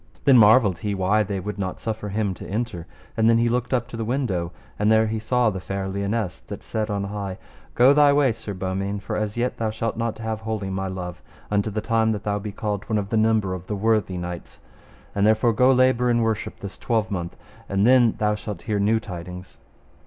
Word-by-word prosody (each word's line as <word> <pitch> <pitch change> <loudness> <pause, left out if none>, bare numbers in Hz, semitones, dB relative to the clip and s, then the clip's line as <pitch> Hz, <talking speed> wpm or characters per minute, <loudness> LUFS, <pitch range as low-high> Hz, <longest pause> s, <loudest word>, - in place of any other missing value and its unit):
Then 135 -2 +7
marvelled 105 -4 +5
he 105 -1 -2
why 95 +3 +2
they 100 -1 -2
would 100 +2 -5
not 95 -2 -3
suffer 110 -2 -4
him 100 -1 -1
to - - -10
enter. 100 -5 -3 0.3
And 110 0 +3
then 115 - +5
he 115 0 +2
looked 125 +1 -1
up 120 -3 0
to 120 - -7
the 115 - -2
window; 110 -9 -1 0.3
and 105 +1 +3
there 110 0 +5
he 110 0 -2
saw 120 +1 +2
the 95 - -5
fair 95 +1 -4
Lionesse 100 0 -2
that - - -7
said 110 -1 -3
on 100 -1 -1
high: 100 -1 -4 0.4
Go 125 +3 +6
thy 145 -1 +6
way, 140 -3 +3
Sir 110 -3 -6
Beaumains, 95 +2 -3
for - - -3
as 105 +1 -2
yet 125 +1 -1
thou 110 -1 -1
shalt 110 +1 -3
not 115 -1 -2
have 110 -1 -3
wholly 110 -3 -3
my 95 0 -2
love, 90 -1 -6 0.3
unto 105 +1 +1
the 110 +1 -3
time 110 0 +1
that 105 - -5
thou 105 0 -1
be 105 +1 -5
called 105 -1 -4
one 110 - +1
of 100 -1 -2
the 115 - -1
number 110 -3 +2
of 90 0 -7
the 105 - -2
worthy 105 -3 +1
knights. 90 0 -7 0.5
And 100 - 0
therefore 110 +2 +4
go 125 +4 +4
labour 130 -1 +3
in 120 -1 +2
worship 110 -1 -2
this 100 -1 -8
twelvemonth, 105 -7 -2 0.3
and 100 +1 +2
then 120 -2 +5
thou 105 0 +1
shalt 105 -3 -6
hear 105 -3 -1
new 110 +3 +2
tidings. 90 -2 -9
105 Hz, 225 wpm, -23 LUFS, 100-115 Hz, 0.5 s, Then